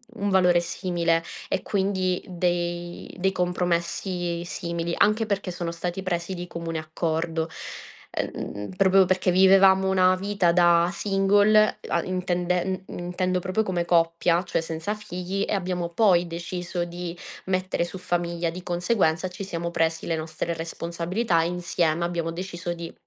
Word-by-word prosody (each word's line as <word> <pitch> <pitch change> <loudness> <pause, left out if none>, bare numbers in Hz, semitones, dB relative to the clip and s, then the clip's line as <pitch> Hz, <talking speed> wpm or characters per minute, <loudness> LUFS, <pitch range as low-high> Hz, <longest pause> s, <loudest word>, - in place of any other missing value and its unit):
un 205 -2 -1
valore 180 -2 +5
simile 170 -1 0 0.3
e 190 - 0
quindi 190 -2 0
dei 175 -1 -2
dei 190 +1 +2
compromessi 180 -2 0 0.6
simili, 170 -1 -3
anche 215 +2 +3
perché 200 -2 -1
sono 175 -1 -3
stati 175 +2 -4
presi 175 -1 -2
di 175 -1 -6
comune 165 -2 -4
accordo, 160 +1 -2 0.6
ehm, 105 0 -4
proprio 190 0 +5
perché 185 0 +2
vivevamo 190 +1 +6
una 185 -1 +4
vita 195 -2 +1
da 175 -1 +5
single 205 +2 +3
e - - -10
a 170 - +2
intenden 180 0 -1
uhm, - - -7
intendendo 180 +1 -1
proprio 185 +4 0
come 180 -2 0
coppia, 170 0 +3
cioè 170 - -1
senza 165 +5 -3
figli 195 -1 -4
e - - -1
abbiamo 180 -3 -1
poi 180 -2 +4
deciso 175 +1 -4
di 175 0 -6 0.3
mettere 185 -1 0
su 175 +2 -6
famiglia. 175 -1 -1
Di 180 +2 -7
conseguenza 175 -1 +1
ci 200 +2 -7
siamo 170 -2 -4
presi 165 -1 0
le 165 - +1
nostre 160 +1 -3
responsabilità 170 +3 -1
insieme, 170 -1 0
abbiamo 170 -1 -2
deciso 175 0 -5
di 170 -1 -7
175 Hz, 145 wpm, -25 LUFS, 170-185 Hz, 0.6 s, vivevamo